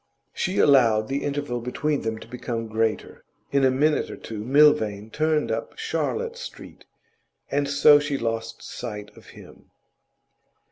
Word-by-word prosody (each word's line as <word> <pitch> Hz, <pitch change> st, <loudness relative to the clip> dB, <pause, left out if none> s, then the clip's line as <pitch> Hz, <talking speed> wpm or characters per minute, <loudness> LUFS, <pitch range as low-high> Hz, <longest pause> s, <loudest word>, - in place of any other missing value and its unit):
She 185 Hz, -, -2 dB
allowed 115 Hz, -6 st, +4 dB
the 140 Hz, +1 st, -2 dB
interval 140 Hz, -4 st, -3 dB
between 145 Hz, +4 st, -1 dB
them 110 Hz, 0 st, -3 dB
to -, -, -12 dB
become 120 Hz, -2 st, -4 dB
greater. 110 Hz, -1 st, -2 dB, 0.3 s
In 140 Hz, -1 st, +2 dB
a 130 Hz, -, +5 dB
minute 145 Hz, +4 st, +1 dB
or -, -, -6 dB
two 105 Hz, -2 st, -7 dB
Milvain 120 Hz, -6 st, +3 dB
turned 155 Hz, -1 st, 0 dB
up 115 Hz, 0 st, -4 dB
Charlotte 455 Hz, +1 st, -2 dB
Street, -, -, -10 dB, 0.7 s
and 145 Hz, 0 st, 0 dB
so 145 Hz, +1 st, +6 dB
she 145 Hz, -1 st, -2 dB
lost 115 Hz, -1 st, -4 dB
sight 105 Hz, -4 st, -7 dB
of -, -, -17 dB
him. -, -, -15 dB
130 Hz, 145 wpm, -24 LUFS, 115-145 Hz, 0.7 s, so